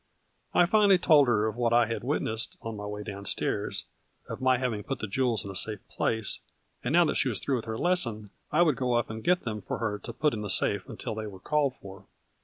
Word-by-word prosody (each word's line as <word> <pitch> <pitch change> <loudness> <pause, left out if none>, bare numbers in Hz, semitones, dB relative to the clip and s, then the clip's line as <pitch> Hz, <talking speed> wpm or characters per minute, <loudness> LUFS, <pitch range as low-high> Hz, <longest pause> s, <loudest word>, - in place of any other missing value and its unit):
I 175 - +6
finally 200 0 +5
told 150 -6 +5
her 110 -3 +2
of 110 -1 -2
what 120 -1 +1
I 120 0 +5
had 115 +1 -4
witnessed 115 -4 -1
on 115 -1 -4
my 105 0 -6
way 105 0 -5
down 100 -1 -7
stairs, - - -1 0.4
of - - -6
my 130 -1 +4
having 120 -5 -2
put 135 +5 -4
the - - -4
jewels 115 0 0
in 100 - -5
a - - -9
safe 105 +1 0
place, 110 -2 -1 0.4
and 150 - 0
that - - +6
now 175 - +6
that 155 - 0
she 135 - +2
was 110 - -1
through 135 +7 -1
with 115 - -6
her 110 -1 -4
lesson, 115 - 0 0.2
I 170 +3 +5
would 155 -7 +2
go 125 -1 0
up 120 -1 0
and 110 0 -7
get 180 0 +3
them 105 -2 -4
for - - -4
her 105 -3 -2
to - - -7
put 150 -1 +1
in 110 - -3
the 105 - -4
safe 95 +1 +1
until 115 - -5
they 110 0 -5
were 95 -2 -10
called 145 +3 0
for. 100 -2 -12
115 Hz, 255 wpm, -28 LUFS, 105-135 Hz, 0.4 s, I